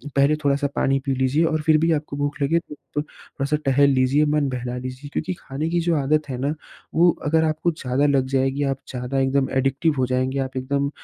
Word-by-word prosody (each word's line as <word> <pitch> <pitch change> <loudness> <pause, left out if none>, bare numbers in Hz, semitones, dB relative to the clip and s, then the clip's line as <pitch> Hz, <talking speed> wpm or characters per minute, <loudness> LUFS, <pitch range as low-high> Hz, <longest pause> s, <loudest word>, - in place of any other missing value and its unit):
पहले 140 +2 +4
थोड़ा-सा 140 0 +2
पानी 135 0 +2
पी 135 - +1
लीजिए 130 +5 +2
और 155 -1 0
फिर 155 0 +4
भी 165 +2 +2
आपको 150 -2 -2
भूख 145 0 -2
लगे 165 +4 +2
तो 150 -2 -6
थोड़ा-सा 150 -1 -4
टहल 140 +1 +4
लीजिए, 135 +2 +3
मन 150 -2 +1
बहला 125 -1 -4
लीजिए 130 +3 -7
क्योंकि 185 - -2
खाने 145 +4 -3
की 175 0 +1
जो 170 -1 +1
आदत 150 +1 +1
है 125 - -3
ना, 145 +2 0 0.4
वो 175 +2 +6 0.2
अगर 160 +2 +3
आपको 160 +2 0
ज़्यादा 135 -1 -1
लग 135 -2 +2
जाएगी, 135 +1 0
आप 135 -1 0
ज़्यादा 125 +1 -3
एकदम 135 0 +1
एडिक्टिव 140 +4 +1
हो 130 - +2
जाएँगे, 130 +1 0
आप 130 -1 -3
एकदम 140 +2 -1
140 Hz, 210 wpm, -23 LUFS, 130-150 Hz, 0.4 s, वो